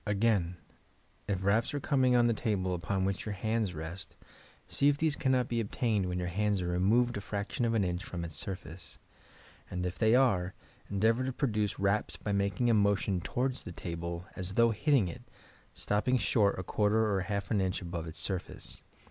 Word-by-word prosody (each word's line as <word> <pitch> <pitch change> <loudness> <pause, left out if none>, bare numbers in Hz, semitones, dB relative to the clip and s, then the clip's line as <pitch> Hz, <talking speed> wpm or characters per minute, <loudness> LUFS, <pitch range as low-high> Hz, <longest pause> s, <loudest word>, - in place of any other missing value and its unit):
Again, 100 -4 +1 0.7
if 95 -2 -1
raps 110 +8 +2
are - - 0
coming 130 -3 +2
on 120 -1 +5
the 120 - +3
table 95 -4 -1
upon 95 +2 -1
which 95 0 -1
your 105 - -3
hands 110 -2 -1
rest, 80 +4 -7 0.5
see 140 - +1
if 145 - +1
these 155 -1 +1
can 130 - 0
not 125 -2 +2
be 120 - -1
obtained 105 -2 0
when 90 0 -2
your 90 0 -2
hands 100 +3 0
are 90 - -2
removed 110 +7 +2
a - - -4
fraction 100 +4 -2
of 115 0 +1
an 105 - +3
inch 90 +1 -2
from 85 -6 -5
its 80 - -8
surface, 85 +1 -5 0.7
and 90 0 -3
if 90 0 -4
they 110 +1 +5
are, 100 -8 +2 0.3
endeavour 110 +5 +2
to 130 - -1
produce 110 -6 -1
raps 100 +2 0
by 105 - -4
making 100 +4 +1
a 115 - +4
motion 100 -3 +2
towards 130 +7 -1
the - - -7
table 85 0 -5
as 95 +1 -2
though 115 0 +5
hitting 120 -1 +2
it, 85 - -7 0.5
stopping 105 +5 +1
short 105 -4 +2
a 95 - -3
quarter 105 +4 +2
or 95 - +1
half 100 +1 -3
an 105 -3 +2
inch 95 0 0
above 85 -2 -5
its 80 - -8
surface. 95 -3 -3
100 Hz, 200 wpm, -31 LUFS, 90-115 Hz, 0.7 s, on